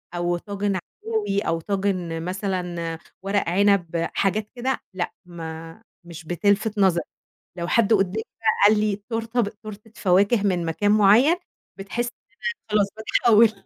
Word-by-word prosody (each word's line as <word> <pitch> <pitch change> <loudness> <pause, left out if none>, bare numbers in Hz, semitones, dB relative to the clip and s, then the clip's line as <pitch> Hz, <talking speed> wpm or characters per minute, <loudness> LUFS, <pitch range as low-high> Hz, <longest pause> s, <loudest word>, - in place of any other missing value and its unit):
أو 175 0 0
طاجن 200 +1 -2
عكاوي 205 +2 -2
أو 165 -3 -1
طاجن 185 -4 -2
مثلًا 180 -3 -3 0.3
ورق 195 -2 0
عِنب، 175 -3 +2
حاجات 205 +2 0
كده 260 +2 -1
لأ، 175 -2 -3
ما 165 +2 -8 0.2
مش 170 -1 -10
بتلْفِت 200 +5 +1
نظري 185 -3 +3 0.5
لو 170 0 -3
حد 230 -2 +3
قُدّامي 200 +1 +2 0.2
بقى 225 - 0 0.2
قال 210 0 +3
لي 210 -2 +1
تورتة 225 +1 -1
ب 210 - +1
تورتة 210 +1 -11
فواكه 200 +4 +3
من 185 -4 +1
مكان 170 +5 0
معيّن 215 - +6 0.4
بتحسّي 235 +5 -3 0.2
إن - - -33
أنا 470 0 -5
خلاص 210 -1 +3
باتحوّل 220 0 +4
200 Hz, 145 wpm, -24 LUFS, 175-215 Hz, 0.5 s, معيّن